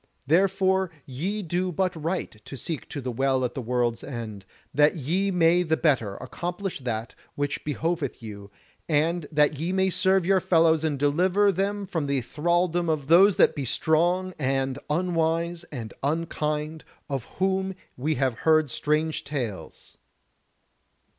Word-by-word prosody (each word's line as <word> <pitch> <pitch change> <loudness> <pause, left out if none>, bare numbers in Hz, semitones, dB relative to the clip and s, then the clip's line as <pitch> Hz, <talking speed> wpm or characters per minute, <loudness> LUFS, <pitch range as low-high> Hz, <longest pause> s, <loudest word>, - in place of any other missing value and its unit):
Therefore 190 +3 +2 0.2
ye 185 +11 -3
do 180 +2 -1
but 185 +1 0
right 165 +4 -2
to 135 - -8
seek 155 +4 -5
to 140 - -5
the 125 -1 -3
Well 130 +1 +1
at 125 - -3
the 130 - -4
World's 120 -1 -1
End, 110 -6 -6 0.3
that 150 +4 +4
ye 175 +7 0
may 175 -1 +4
the 160 -2 +1
better 120 -11 +1
accomplish 175 - -5
that 115 -3 -4 0.2
which 145 0 -2
behoveth 150 -1 -2
you, 100 -2 -8 0.4
and 160 +1 +1
that 150 -1 +2
ye 165 +3 -1
may 190 0 +2
serve 190 -1 +3
your 190 +1 +4
fellows 165 -3 +3
and 155 -3 0
deliver 180 +8 +3
them 200 +2 -1
from 165 -6 -2
the 140 -2 +1
thralldom 175 +4 0
of 150 -3 -1
those 190 +4 +7
that - - +4
be 145 - -3
strong 175 +8 +1
and 135 0 0
unwise 170 +1 0
and 120 -9 -7
unkind, 155 0 -2 0.2
of 135 -5 -3
whom 190 0 0 0.2
we 150 +5 -1
have 130 -5 0
heard 155 -4 +3
strange 155 +4 0
tales." 115 - -6
160 Hz, 150 wpm, -26 LUFS, 135-180 Hz, 0.4 s, those